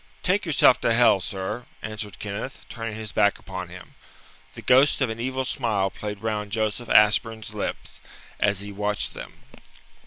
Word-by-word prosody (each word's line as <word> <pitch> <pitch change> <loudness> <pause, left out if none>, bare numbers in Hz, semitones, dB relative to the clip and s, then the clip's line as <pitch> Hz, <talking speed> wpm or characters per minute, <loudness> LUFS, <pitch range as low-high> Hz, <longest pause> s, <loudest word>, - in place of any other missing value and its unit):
"Take 190 +1 +1
yourself 140 -4 +5
to 115 - +2
hell, 115 -4 +5
sir!" 95 +5 -4 0.2
answered 105 -1 -5
Kenneth, 105 +6 -5
turning 115 -2 -5
his 110 -2 -6
back 100 - +3
upon 95 -2 -7
him. 90 +1 -12 0.6
The - - -9
ghost 130 +3 +5
of 130 -5 +1
an 110 - -6
evil 130 +2 -2
smile 110 -8 0
played 105 0 -6
round 105 -2 -2
Joseph 110 +2 -2
Ashburn's 110 0 +3
lips 105 - -5 0.4
as 100 -2 +2
he 100 0 -5
watched 105 0 -2
them. - - -10
110 Hz, 160 wpm, -25 LUFS, 100-120 Hz, 0.6 s, yourself